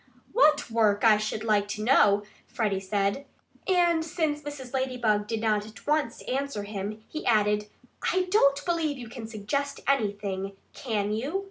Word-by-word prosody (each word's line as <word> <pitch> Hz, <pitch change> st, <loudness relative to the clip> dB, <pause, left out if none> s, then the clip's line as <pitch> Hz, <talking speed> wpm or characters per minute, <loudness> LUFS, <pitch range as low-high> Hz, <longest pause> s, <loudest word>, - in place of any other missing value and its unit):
"What 305 Hz, -, +4 dB
work, 215 Hz, -3 st, +2 dB
I 220 Hz, -2 st, +7 dB
should 215 Hz, 0 st, -3 dB
like 210 Hz, -2 st, +2 dB
to 210 Hz, +1 st, -4 dB
know 205 Hz, -4 st, +5 dB
" -, -, -31 dB
Freddie 205 Hz, -4 st, 0 dB
said. 200 Hz, +7 st, -1 dB, 0.4 s
And 345 Hz, -3 st, +3 dB
since 315 Hz, -2 st, -1 dB
Mrs. 280 Hz, -3 st, -8 dB
Ladybug 240 Hz, -6 st, 0 dB
did 225 Hz, -1 st, -2 dB
not 215 Hz, -2 st, +1 dB
at 215 Hz, -2 st, -14 dB
once 300 Hz, -5 st, 0 dB
answer 270 Hz, -4 st, -2 dB
him, 205 Hz, +1 st, -5 dB
he 310 Hz, -, -6 dB
added: 210 Hz, -2 st, +2 dB, 0.4 s
"I 370 Hz, -, +2 dB
don't 280 Hz, -9 st, +4 dB
believe 330 Hz, -5 st, 0 dB
you 240 Hz, -3 st, -8 dB
can 230 Hz, -2 st, -7 dB
suggest 260 Hz, +7 st, -3 dB
anything 200 Hz, -6 st, -1 dB, 0.2 s
can 210 Hz, -5 st, -2 dB
you?" 275 Hz, -, -2 dB
225 Hz, 160 wpm, -27 LUFS, 210-280 Hz, 0.4 s, I